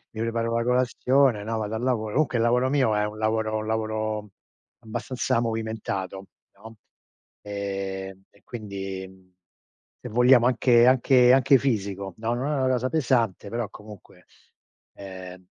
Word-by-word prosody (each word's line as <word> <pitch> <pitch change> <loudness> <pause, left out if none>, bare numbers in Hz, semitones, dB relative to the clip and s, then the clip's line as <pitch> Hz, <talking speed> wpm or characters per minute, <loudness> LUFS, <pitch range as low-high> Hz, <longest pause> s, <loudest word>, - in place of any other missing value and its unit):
Mi 110 - -4
preparo 115 0 -1
la 115 - +1
colazione, 125 -1 +2
no, 115 +1 -3
vado 110 +1 -3
al 110 - -4
lavo 125 -4 0
comunque 130 -6 +1
il 115 - +1
lavoro 125 +2 +2
mio 130 -6 +2
è 105 - +1
un 105 0 -6
lavoro 110 0 0
un 110 0 -4
lavoro 110 -1 -2 0.5
abbastanza 120 +2 -2
movimentato, 110 -4 -4 0.3
no, 110 +3 -13 0.7
ehm, 95 -1 -5
e 100 - -27
quindi, 95 -4 -6
mhmm, 95 -1 -20 0.7
se - - -7
vogliamo, 125 +1 +5
anche 120 -1 +4
anche 125 -1 +5
anche 135 +1 +5
fisico, 100 -6 -2
no, 115 +2 -2
non 125 +3 -2
è - - 0
una 130 - +2
cosa 130 0 0
pesante 120 - 0
però, 115 -1 -3
comunque, 105 -1 -14 0.7
ehm, 95 -1 -10
110 Hz, 150 wpm, -25 LUFS, 100-125 Hz, 0.7 s, vogliamo